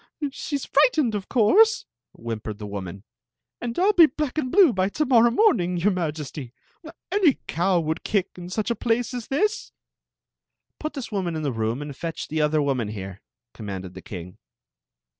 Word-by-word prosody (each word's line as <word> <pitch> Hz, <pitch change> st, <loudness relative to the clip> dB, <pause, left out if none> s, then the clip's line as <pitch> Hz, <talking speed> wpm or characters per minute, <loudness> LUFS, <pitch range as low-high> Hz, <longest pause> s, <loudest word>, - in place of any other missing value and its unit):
" 290 Hz, -3 st, -5 dB
She 285 Hz, +1 st, -3 dB
's 275 Hz, -, -7 dB
frightened, 305 Hz, -, +3 dB
of 200 Hz, -2 st, -4 dB
cf»urse," 430 Hz, -, +4 dB, 0.3 s
whimpered 110 Hz, -2 st, -6 dB
the 105 Hz, -, -7 dB
woman, 100 Hz, -1 st, -6 dB, 0.6 s
"and 235 Hz, -1 st, -4 dB
I 360 Hz, -, +2 dB
'11 -, -, -15 dB
be 330 Hz, -6 st, +7 dB
Made 275 Hz, -, -8 dB
and 255 Hz, -4 st, -3 dB
b^ 360 Hz, -, +6 dB
by 190 Hz, +1 st, +1 dB
to 305 Hz, +9 st, -1 dB
morrow 240 Hz, -3 st, +5 dB
morning, 230 Hz, -, +2 dB
your 190 Hz, +5 st, +2 dB
Majcify. 150 Hz, -7 st, -4 dB, 0.3 s
mm 320 Hz, -, -9 dB, 0.2 s
mdd 405 Hz, +1 st, 0 dB, 0.8 s
lade 200 Hz, -4 st, 0 dB
m 175 Hz, -1 st, -8 dB
sii^ll 210 Hz, +5 st, -2 dB
a -, -, 0 dB
place 240 Hz, +2 st, 0 dB
at 245 Hz, -, -3 dB
thts." 425 Hz, +11 st, 0 dB, 0.5 s
" -, -, -60 dB
Piii 310 Hz, -, -4 dB
this 270 Hz, -5 st, -6 dB
woman 185 Hz, -5 st, -2 dB
in 155 Hz, -, -3 dB
the 140 Hz, -3 st, -1 dB
room 115 Hz, +5 st, -2 dB
and 145 Hz, -2 st, -7 dB
fetch 165 Hz, +2 st, -5 dB
the 155 Hz, 0 st, 0 dB
other 150 Hz, 0 st, +2 dB
woman 130 Hz, -6 st, 0 dB
here, 95 Hz, -2 st, -7 dB, 0.2 s
" 120 Hz, -, -65 dB
commanded 95 Hz, -4 st, -7 dB
the 95 Hz, -, -10 dB
king. 90 Hz, -7 st, -9 dB
180 Hz, 190 wpm, -24 LUFS, -, 0.8 s, be